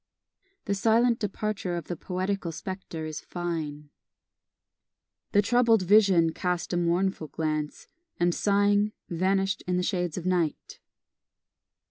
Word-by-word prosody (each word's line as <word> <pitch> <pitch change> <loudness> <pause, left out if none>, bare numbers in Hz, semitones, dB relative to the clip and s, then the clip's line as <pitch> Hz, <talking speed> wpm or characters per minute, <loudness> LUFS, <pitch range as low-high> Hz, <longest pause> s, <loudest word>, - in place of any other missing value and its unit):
The 200 - 0
silent 230 +4 +3
departure 205 -3 -2
of 170 - -3
the 175 - -4
poetical 185 +1 -3
spectre 175 -2 -6
is 155 -1 -5
fine: 155 -4 -5 1.4
The 205 - +4
troubled 235 -4 +4
vision 190 -4 +5
cast 180 +1 -2
a - - +1
mournful 175 0 0
glance, 155 -1 -3 0.3
And 175 0 +3
sighing, 205 +1 +2 0.2
vanish'd 190 +2 +1
in 180 0 +1
the 180 - 0
shades 180 -4 -1
of 180 - -5
night. 175 -4 -1
180 Hz, 120 wpm, -27 LUFS, 170-200 Hz, 1.4 s, vision